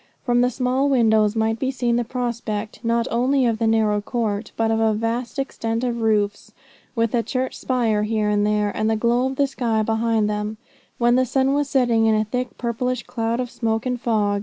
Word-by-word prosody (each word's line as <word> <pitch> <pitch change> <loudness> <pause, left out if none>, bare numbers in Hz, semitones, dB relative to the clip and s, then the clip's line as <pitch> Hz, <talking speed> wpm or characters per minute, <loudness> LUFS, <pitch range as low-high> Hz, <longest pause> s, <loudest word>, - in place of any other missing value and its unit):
From 245 -1 +3
the 250 - +3
small 255 +2 0
windows 220 -5 +3
might 225 0 0
be 260 - 0
seen 245 -3 0
the 240 - +1
prospect, 230 -4 -4
not 230 0 +1
only 255 +3 +2
of 225 -2 0
the 225 - +1
narrow 215 -2 +2
court, 215 -1 -2
but 225 0 +1
of 225 - +1
a 220 -1 +2
vast 230 +4 -3
extent 230 -4 -2
of 235 -2 -2
roofs, 210 -1 0 0.4
with 230 -1 0
a 240 - +2
church 255 +2 -3
spire 230 -5 0
here 215 0 0
and 205 0 +2
there, 210 -1 0
and 215 0 0
the 220 - +2
glow 240 +3 +1
of 265 - -4
the 280 - +2
sky 235 -5 -1
behind 225 -1 +1
them, 210 +1 -3 0.4
when 240 +1 +3
the 255 - +4
sun 265 +2 +1
was 285 -1 0
setting 240 -5 +2
in 220 - +4
a 215 0 +1
thick 250 +3 -4
purplish 250 +1 -2
cloud 230 +1 -2
of 250 -1 -3
smoke 225 -1 -1
and 250 -1 -2
fog. 210 -4 +1
230 Hz, 210 wpm, -22 LUFS, 220-250 Hz, 0.4 s, the